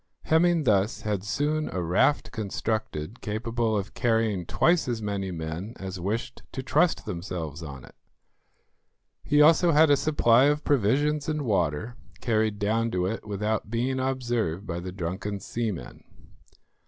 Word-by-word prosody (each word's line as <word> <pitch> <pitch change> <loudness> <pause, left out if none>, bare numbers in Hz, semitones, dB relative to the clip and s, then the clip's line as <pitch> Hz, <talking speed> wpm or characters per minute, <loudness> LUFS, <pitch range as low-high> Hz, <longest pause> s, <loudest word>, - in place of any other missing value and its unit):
Hemming 165 0 +3
thus 105 -2 +2
had 105 -3 -2
soon 145 +9 -1
a 95 - -3
raft 90 - +2
constructed 110 -4 -3
capable 110 +1 -1
of 100 0 -4
carrying 110 -7 0
twice 170 -3 +2
as 120 -2 -1
many 100 -2 -3
men 85 +6 -5
as 95 -1 -6
wished 105 +6 -3
to 130 - -4
trust 160 +6 +2
themselves 85 -3 -5
on 70 -5 -8
it. - - -16 1.3
He 150 0 +4
also 165 +2 +5
had 155 0 +6
a - - +7
supply 130 -4 +4
of 150 +1 +2
provisions 145 +5 +1
and 155 -1 -1
water 100 - -1 0.2
carried 110 -2 +1
down 110 +3 +1
to 90 -4 -1
it 110 +2 -4
without 105 +1 -2
being 125 +3 -1
observed 120 -9 -1
by 85 -2 -4
the 90 +1 -6
drunken 95 +3 -4
seamen. 110 -2 -4
110 Hz, 145 wpm, -26 LUFS, 95-130 Hz, 1.3 s, a